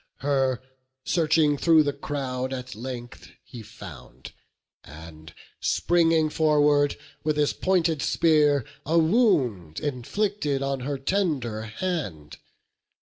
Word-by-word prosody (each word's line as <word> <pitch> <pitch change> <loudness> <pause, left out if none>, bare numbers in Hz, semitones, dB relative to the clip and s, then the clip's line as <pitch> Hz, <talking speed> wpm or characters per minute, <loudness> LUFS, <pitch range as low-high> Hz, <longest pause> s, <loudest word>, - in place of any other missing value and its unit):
Her, 135 -2 0 0.4
searching 155 -3 +2
thro' 160 -2 +5
the 145 -1 -1
crowd, 135 -2 -4
at 130 0 -6
length 120 +1 -8
he 120 -3 -10
found, 110 - -12 0.5
And 80 +1 -12 0.3
springing 165 -2 +2
forward, 150 -2 +3 0.3
with 155 -1 0
his 150 -1 +2
pointed 170 -5 +1
spear 150 -5 +3 0.2
A 165 +3 +1
wound 160 - +2
inflicted 145 - -2
on 135 -1 -2
her 140 +2 -3
tender 135 - -1
hand. 110 - -4
145 Hz, 105 wpm, -25 LUFS, 125-160 Hz, 0.5 s, thro